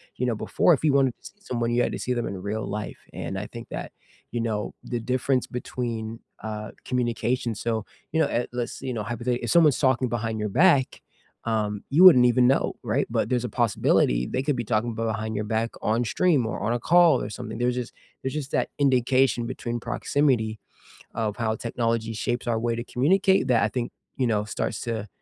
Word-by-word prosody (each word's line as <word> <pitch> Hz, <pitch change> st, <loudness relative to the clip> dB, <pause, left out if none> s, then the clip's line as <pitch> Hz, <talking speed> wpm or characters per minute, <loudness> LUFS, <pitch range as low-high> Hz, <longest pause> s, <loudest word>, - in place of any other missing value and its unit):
You 125 Hz, -, -1 dB
know, 120 Hz, -2 st, 0 dB
before, 170 Hz, -, +3 dB
if 150 Hz, -, -1 dB
you 155 Hz, -, +4 dB
wanted 135 Hz, -2 st, +3 dB
to -, -, -26 dB
see 205 Hz, -, -12 dB
someone, 120 Hz, -9 st, -2 dB
you 120 Hz, +1 st, +3 dB
had -, -, 0 dB
to -, -, -4 dB
see 125 Hz, -, -1 dB
them 120 Hz, -1 st, -2 dB
in 95 Hz, 0 st, -5 dB
real 105 Hz, +2 st, -3 dB
life, 105 Hz, +1 st, -4 dB, 0.2 s
and 95 Hz, -, -4 dB
I 105 Hz, -, -5 dB
think 115 Hz, -1 st, -10 dB
that, -, -, -6 dB, 0.4 s
you 120 Hz, -, -2 dB
know, 110 Hz, -2 st, -2 dB
the 120 Hz, -, -3 dB
difference 130 Hz, +2 st, 0 dB
between, 115 Hz, -2 st, -4 dB, 0.2 s
uh, 105 Hz, -1 st, -5 dB
communication, 120 Hz, -1 st, -1 dB
so 110 Hz, -1 st, -2 dB, 0.3 s
you 160 Hz, -, +1 dB
know, -, -, +4 dB
uh, 120 Hz, -, 0 dB
let's 120 Hz, -1 st, -4 dB
you 130 Hz, -1 st, -3 dB
know, 110 Hz, -3 st, -3 dB
hypothetically, 120 Hz, +2 st, -2 dB
if -, -, -3 dB
someone's 155 Hz, -6 st, +5 dB
talking 130 Hz, -2 st, +2 dB
behind 110 Hz, -1 st, -2 dB
your 105 Hz, -, -1 dB
back, 145 Hz, -, +3 dB, 0.4 s
um, 105 Hz, -3 st, -1 dB
you 155 Hz, +7 st, +5 dB
wouldn't 130 Hz, -9 st, +9 dB
even 125 Hz, 0 st, +4 dB
know, 135 Hz, -, +2 dB
right? -, -, 0 dB
But -, -, 0 dB
there's 125 Hz, -2 st, +1 dB
a -, -, -3 dB
possibility 100 Hz, -, +2 dB
they 130 Hz, -, -2 dB
could 145 Hz, 0 st, +1 dB
be 120 Hz, -, -1 dB
talking 115 Hz, +2 st, 0 dB
b 115 Hz, -, -2 dB
behind 110 Hz, -1 st, -2 dB
your 105 Hz, -, -1 dB
back 115 Hz, +1 st, -1 dB
on 115 Hz, +3 st, +1 dB
stream, 150 Hz, 0 st, +2 dB
or -, -, -4 dB
on 105 Hz, +3 st, 0 dB
a 120 Hz, -, -1 dB
call 170 Hz, +5 st, +5 dB
or 105 Hz, -, -4 dB
something. 110 Hz, 0 st, -6 dB
There's 125 Hz, +1 st, +1 dB
just 125 Hz, -2 st, -4 dB, 0.3 s
there's 130 Hz, -, -2 dB
just 145 Hz, -3 st, -4 dB
that -, -, 0 dB
indication 130 Hz, -2 st, +3 dB
between 120 Hz, 0 st, -4 dB
proximity 120 Hz, -3 st, 0 dB, 0.6 s
of 110 Hz, -3 st, -2 dB
how 110 Hz, -1 st, 0 dB
technology 115 Hz, -1 st, -1 dB
shapes 120 Hz, +3 st, -2 dB
our 115 Hz, -2 st, +1 dB
way 115 Hz, 0 st, 0 dB
to 120 Hz, -, -4 dB
communicate 190 Hz, +9 st, +3 dB
that 120 Hz, -4 st, +4 dB
I 105 Hz, -, +3 dB
think, 120 Hz, +2 st, -3 dB, 0.3 s
you 130 Hz, -, +2 dB
know, 105 Hz, -3 st, +1 dB
starts 110 Hz, -, -3 dB
to 110 Hz, -3 st, -3 dB
120 Hz, 215 wpm, -25 LUFS, 110-130 Hz, 0.6 s, wouldn't